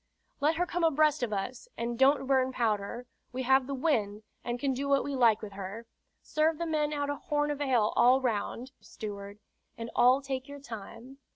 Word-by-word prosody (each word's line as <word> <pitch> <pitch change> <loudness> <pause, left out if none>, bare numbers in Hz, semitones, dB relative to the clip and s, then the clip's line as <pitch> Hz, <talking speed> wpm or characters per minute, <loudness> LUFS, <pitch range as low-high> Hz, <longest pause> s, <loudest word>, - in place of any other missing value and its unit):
"Let 305 +3 +2
her 355 +2 +1
come 350 0 -2
abreast 305 -2 +3
of 240 -3 -1
us, 225 - -4
and 235 +1 -2
don't 270 +3 +4
burn 260 -1 +2
powder. 230 0 -1 0.3
We 255 +1 -3
have 265 0 +3
the 275 - -3
wind, 220 -8 0 0.2
and 240 0 -3
can 270 +1 0
do 280 +2 -3
what 275 -1 +3
we 285 -1 -3
like 230 -4 +4
with 205 -2 -7
her. 200 +4 -7 0.4
Serve 310 +1 +1
the 340 - -2
men 305 -2 0
out 285 -1 -1
a 285 - -4
horn 295 0 -1
of 290 0 -4
ale 245 -6 +2
all 255 +2 +5
round, 245 +1 -2
steward, 200 -2 -8 0.4
and 230 0 -6
all 255 +2 +5
take 265 -1 -4
your 285 0 -9
time." 235 +1 -10
260 Hz, 200 wpm, -30 LUFS, 230-285 Hz, 0.4 s, all